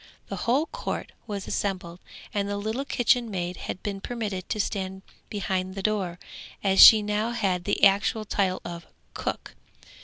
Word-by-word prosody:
The - - -3
whole 270 +7 +3
court - - -5 0.2
was 200 -3 -4
assembled, 185 -3 -3 0.3
and 200 -1 -1
the 205 - -2
little 220 +7 -3
kitchen 245 -3 +2
maid 180 -3 -3
had 185 - -6
been 200 -2 -4
permitted 205 -6 -4
to 215 - -2
stand 190 -2 -3 0.3
behind 190 -2 -2
the 195 - -5
door, 195 -5 -1 0.5
as 195 -1 +5
she 215 -2 +10
now 210 +2 0
had 190 -6 0
the - - -1
actual 200 +2 +4
title 190 -2 0
of 170 -1 -7 0.3
cook. - - -4
200 Hz, 160 wpm, -26 LUFS, 185-215 Hz, 0.5 s, she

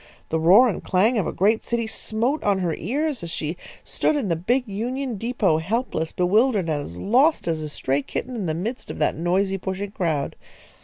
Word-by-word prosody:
The 160 - 0
roar 190 +10 +7
and 210 - -3
clang 215 +6 +2
of 190 - -1
a - - -1
great 215 +4 +2
city 235 -1 -1
smote 225 +6 -2
on 200 -1 +2
her 175 -3 -1
ears 275 - -2
as 170 - -5
she 160 0 -3 0.3
stood 310 - 0
in 260 -9 -1
the 165 - +2
big 245 +10 0
Union 245 +5 -3
depot, 210 -7 +1
helpless, 185 -3 -2
bewildered, 200 +1 +2
and 150 -2 0
as 85 -10 -8
lost 260 - +3
as 160 -2 0
a 155 - -4
stray 140 -1 -1
kitten 250 - -5
in 205 -6 -3
the 155 - -1
midst 220 +9 -4
of - - -6
that 150 - +1
noisy, 190 +4 0
pushing 190 +2 -4
crowd. 160 -8 -1
195 Hz, 205 wpm, -23 LUFS, 165-235 Hz, 0.3 s, roar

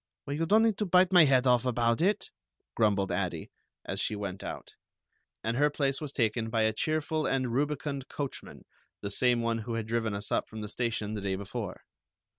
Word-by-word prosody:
"Well, 140 - -3
you 165 +2 -1
don't 215 +4 +5
need 220 -3 +2
to 210 - 0
bite 180 +1 +5
my 175 -3 +8
head 130 -2 +4
off 125 -2 +4
about 120 -1 +1
it," 200 +3 +1 0.4
grumbled 100 -3 +2
Addie, 90 -3 -2 0.3
as - - -3
she 110 - -1
went 100 -2 -5
out, - - -7 0.7
and 115 +1 -1
her 145 +3 +4
place 140 -1 -1
was 150 -3 -4
taken 115 -3 0
by 110 -1 +1
a 110 0 +2
cheerful 155 +4 -1
and 130 -3 0
rubicund 140 0 -1
coachman, 140 -2 -6 0.4
the 100 - -4
same 120 +2 +3
one 115 0 0
who 115 +1 -4
had 115 -1 -2
driven 110 -2 -1
us 100 +2 -5
up - - 0
from 110 0 -7
the 105 - -5
station 110 -3 -2
the 105 - -3
day 95 -1 -1
before. 100 0 -6
120 Hz, 205 wpm, -29 LUFS, 110-145 Hz, 0.7 s, my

